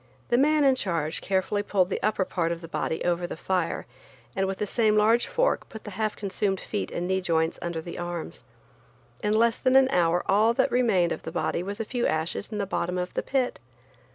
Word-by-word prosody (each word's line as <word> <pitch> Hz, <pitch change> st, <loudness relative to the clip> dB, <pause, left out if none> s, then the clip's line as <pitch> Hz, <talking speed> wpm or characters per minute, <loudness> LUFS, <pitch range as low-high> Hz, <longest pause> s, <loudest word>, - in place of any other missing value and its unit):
The 240 Hz, -, +3 dB
man 300 Hz, +2 st, +4 dB
in 270 Hz, -1 st, +5 dB
charge 170 Hz, -9 st, -1 dB
carefully 195 Hz, +1 st, 0 dB
pulled 195 Hz, -2 st, +1 dB
the -, -, -2 dB
upper 210 Hz, -3 st, +1 dB
part 170 Hz, -2 st, -1 dB
of 170 Hz, 0 st, -4 dB
the 165 Hz, -, -8 dB
body 160 Hz, 0 st, -2 dB
over 175 Hz, 0 st, 0 dB
the -, -, -6 dB
fire, 180 Hz, -1 st, -1 dB, 0.5 s
and 195 Hz, -, +1 dB
with 190 Hz, 0 st, -3 dB
the -, -, -1 dB
same 215 Hz, 0 st, +2 dB
large 225 Hz, +3 st, +4 dB
fork -, -, 0 dB
put 220 Hz, -, -10 dB
the 210 Hz, -, -7 dB
half 215 Hz, +2 st, -2 dB
consumed 195 Hz, -1 st, -1 dB
feet 210 Hz, -, -3 dB
and 175 Hz, -, -3 dB
knee 190 Hz, 0 st, +1 dB
joints 165 Hz, -2 st, 0 dB
under 170 Hz, -2 st, -3 dB
the 170 Hz, +2 st, -7 dB
arms. 175 Hz, -1 st, -5 dB, 0.8 s
In 210 Hz, -1 st, +1 dB
less 230 Hz, 0 st, +3 dB
than 260 Hz, 0 st, +2 dB
an 265 Hz, 0 st, +6 dB
hour 175 Hz, 0 st, +2 dB
all 215 Hz, +4 st, +3 dB
that 265 Hz, 0 st, +2 dB
remained 215 Hz, -9 st, +3 dB
of -, -, -3 dB
the 160 Hz, -, -6 dB
body 170 Hz, 0 st, -1 dB
was 200 Hz, +4 st, -5 dB
a 225 Hz, -, -2 dB
few 245 Hz, +2 st, -1 dB
ashes 160 Hz, +7 st, -2 dB
in 215 Hz, -, -3 dB
the 200 Hz, -, -1 dB
bottom 180 Hz, -2 st, -2 dB
of 180 Hz, 0 st, -3 dB
the -, -, -1 dB
pit. 265 Hz, -2 st, -1 dB
195 Hz, 225 wpm, -26 LUFS, 175-225 Hz, 0.8 s, an